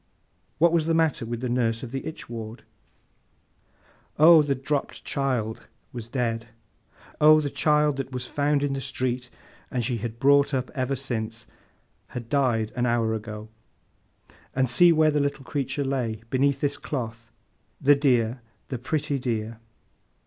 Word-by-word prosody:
What 170 +2 +4
was 165 -2 +1
the 165 - +2
matter 160 -8 +1
with 120 0 -4
the 130 - -1
nurse 120 -1 0
of 120 - -7
the 135 0 -4
itch 160 - -7
ward? 115 -1 -7 1.5
Oh, 160 +1 +8
'the 145 -2 0
dropped 135 +2 -3
child' 125 -6 -2 0.3
was 120 -2 -6
dead! 115 -2 -2 0.7
Oh, 155 +1 +8
the 145 -2 -2
child 150 -2 +2
that 135 0 -4
was 125 -1 -4
found 145 +2 0
in 140 -1 0
the 135 - -3
street, 125 -1 -2 0.4
and 125 -3 -1
she 120 -1 -1
had 115 +1 -5
brought 140 +1 +4
up 130 -1 -2
ever 135 -1 -1
since, 115 -4 -4 0.6
had 120 -2 -7
died 120 -6 +1
an 125 -1 +1
hour 115 -2 +1
ago, 110 0 -6 1.1
and 130 0 +2
see 170 +9 +6
where 155 -1 +4
the 150 - +1
little 140 -1 -2
creature 140 +1 -2
lay, 120 -5 -2
beneath 135 +1 +2
this 145 0 0
cloth! 115 -4 -5 0.5
The 145 - +6
dear, 125 -4 +1 0.3
the 130 - -4
pretty 145 +2 -1
dear! 115 -2 -3
130 Hz, 155 wpm, -25 LUFS, 115-145 Hz, 1.5 s, Oh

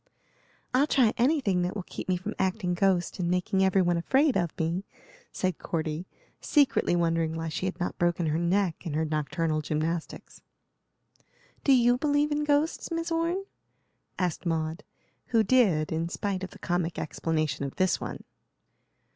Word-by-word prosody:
"I'll 270 +4 +4
try 245 -7 +3
anything 240 - +2
that 180 +2 -2
will 200 - -3
keep - - -8
me 185 - +2
from 185 - -5
acting 190 -1 0
ghost 185 0 +1
and 170 -1 0
making 180 +2 +1
every 190 0 +3
one 175 -1 +2
afraid 265 - +2
of 175 -3 +1
me," 170 +4 -1 0.5
said 185 -3 -2
Cordy, 160 +1 -3 0.3
secretly 280 - +2
wondering 165 -1 +1
why 165 0 -3
she 170 +4 -2
had 185 -1 -5
not 175 - -3
broken 175 0 +1
her 155 +1 0
neck 175 0 0
in 160 -5 -4
her 160 +1 +1
nocturnal 155 +1 -1
gymnastics. 160 +2 -3 1.2
"Do 280 - +3
you 245 -1 +5
believe 290 +1 +2
in 295 0 0
ghosts, 295 +2 +1
Miss 335 0 -3
Orne?" 335 +4 0 0.7
asked 180 -3 -1
Maud, 165 +1 -2 0.4
who 230 -2 +3
did, 195 -10 +3
in 165 +1 -1
spite 190 +1 -3
of 190 - -4
the - - -14
comic 175 -1 -2
explanation 155 -3 -2
of 140 - -4
this 185 -1 +1
one. - - -6
180 Hz, 165 wpm, -28 LUFS, 165-235 Hz, 1.2 s, you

